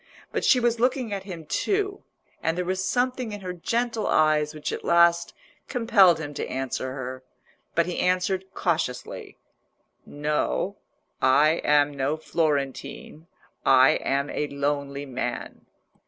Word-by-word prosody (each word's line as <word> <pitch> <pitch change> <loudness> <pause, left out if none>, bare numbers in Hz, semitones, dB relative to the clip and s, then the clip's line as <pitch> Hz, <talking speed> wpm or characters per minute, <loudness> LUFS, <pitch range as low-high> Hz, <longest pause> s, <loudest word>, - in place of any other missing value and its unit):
But - - -2
she 255 - +5
was 235 -1 +1
looking 250 -2 +1
at 195 -1 -4
him 170 -5 -8
too, 400 - -1 0.4
and 165 +1 0
there 180 - -1
was 185 +1 -1
something 250 +1 0
in 205 - -7
her 180 -1 -5
gentle 230 +5 -1
eyes 155 -1 +3
which 155 -1 -5
at - - -5
last 170 0 +4 0.4
compelled 225 -8 +4
him 145 -2 -6
to - - -4
answer 130 0 -3
her. 130 -1 -6 0.5
But 170 - +3
he 180 - -3
answered 185 +1 +1
cautiously— 160 -8 -2 0.7
"No, 150 +6 -2 0.4
I 150 +5 +4
am 145 0 +4
no 140 +3 -1
Florentine; 150 0 -2 0.4
I 130 0 +6
am 140 +1 -1
a 150 - -2
lonely 140 0 -2
man." 130 -3 -5
165 Hz, 140 wpm, -25 LUFS, 145-195 Hz, 0.7 s, I